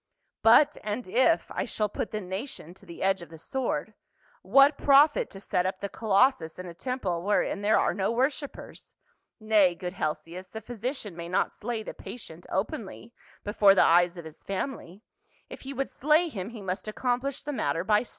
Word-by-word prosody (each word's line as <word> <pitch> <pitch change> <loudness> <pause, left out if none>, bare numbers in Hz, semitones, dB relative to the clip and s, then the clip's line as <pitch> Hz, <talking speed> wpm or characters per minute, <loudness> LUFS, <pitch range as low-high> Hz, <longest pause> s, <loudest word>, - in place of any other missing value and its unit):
" - - -49
But 290 +7 +6
and 210 +2 -4
if 260 - +2
I - - -2
shall 215 - -1
put 210 - -4
the 215 - -4
nation 190 - -6
to - - -18
the 170 - -7
edge 190 -1 +2
of 170 - -10
the 165 - -11
sword, 215 - -3 0.5
what 275 +8 +5
profit 285 +2 +4
to 195 - -10
set 180 -2 0
up 185 0 -4
the 200 - -4
colossus 215 -5 +2
in 185 - -7
a 175 - -8
temple 190 -4 -3
wherein 205 +1 0
there 210 +2 +3
are - - +2
no 195 +1 0
worshipers? 265 +4 -3 0.5
Nay, 210 -5 +3
good 180 +1 -5
Helcias, 165 +2 -4
the 220 - -7
physician 230 - -5
may 170 0 -7
not 180 - +1
slay 225 0 -4
the - - -7
patient 175 -8 -10
openly 215 +3 -4 0.3
before 205 -1 +5
the - - +6
eyes 175 +1 +4
of 170 - -8
his 160 0 -12
family; 195 -2 -5 0.5
if - - -10
he 270 - -7
would 275 0 -2
slay 310 +5 +2
him, 195 -7 -5
he 230 -4 -9
must 190 +3 -4
accomplish 250 +5 -2
the 295 0 -4
matter 165 - -1
by 210 +3 +3
210 Hz, 190 wpm, -27 LUFS, 180-250 Hz, 0.5 s, But